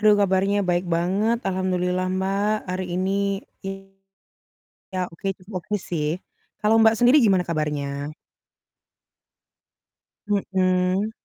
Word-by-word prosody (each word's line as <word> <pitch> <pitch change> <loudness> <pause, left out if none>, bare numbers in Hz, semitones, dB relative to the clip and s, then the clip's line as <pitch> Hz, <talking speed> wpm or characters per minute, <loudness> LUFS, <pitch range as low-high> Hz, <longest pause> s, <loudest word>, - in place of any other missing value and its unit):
Aduh 215 -1 +6
kabarnya 195 +1 +2
baik 175 0 +1
banget, 190 +7 +1
Alhamdulillah 185 -1 0
Mbak, 195 +2 0 0.2
hari 185 +1 -2
ini 185 +1 0 0.6
iya, 195 0 -10 0.9
oke 165 - -13
cukup 190 +3 -15
oke 210 +4 -3
sih. 155 -4 -1 0.6
Kalau 215 +1 +4
Mbak, 225 0 +6
sendiri 245 +4 +6
gimana 190 -4 +4
kabarnya? 145 -2 -2 2.1
Mhm. 190 0 +1
190 Hz, 100 wpm, -24 LUFS, 180-200 Hz, 2.1 s, Aduh